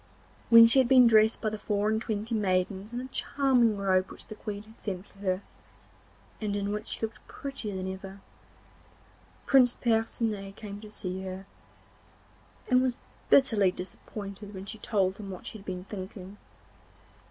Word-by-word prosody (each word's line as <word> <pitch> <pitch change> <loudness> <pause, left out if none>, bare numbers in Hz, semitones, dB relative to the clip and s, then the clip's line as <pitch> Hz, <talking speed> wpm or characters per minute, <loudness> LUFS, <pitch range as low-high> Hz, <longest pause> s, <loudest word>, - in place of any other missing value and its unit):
When 230 0 +10
she 230 +4 +5
had 260 - +4
been 255 -1 +7
dressed 220 -1 +5
by 215 - 0
the 215 - -5
four 205 0 0
and 220 0 +1
twenty 220 0 -3
maidens 195 0 0
in 240 +1 -3
a 260 - -6
charming 250 -6 +2
robe 190 -1 +2
which - - -12
the - - -8
Queen 210 -1 -6
had 220 +1 -18
sent 190 -2 -4
for 200 - -22
her, 185 -1 -1 1.0
and 205 -2 -1
in 200 0 -1
which 210 +2 -4
she - - -3
looked 225 0 -5
prettier 255 -8 -6
than 185 0 -3
ever, 195 +1 -9 1.3
Prince 255 -3 +5
Percinet 225 -3 -1
came 205 -1 -8
to 215 - -10
see 190 -2 -4
her, 190 0 -6 1.2
and 255 -1 +4
was 255 -2 0 0.3
bitterly 220 -8 +5
disappointed 200 +2 -8
when 190 +1 -7
she 220 +2 -6
told 195 -3 0
him 200 -2 -7
what 185 -2 -8
she 220 - -6
had 195 - -16
been 180 -1 -5
thinking. 195 0 -8
210 Hz, 170 wpm, -29 LUFS, 195-225 Hz, 1.3 s, When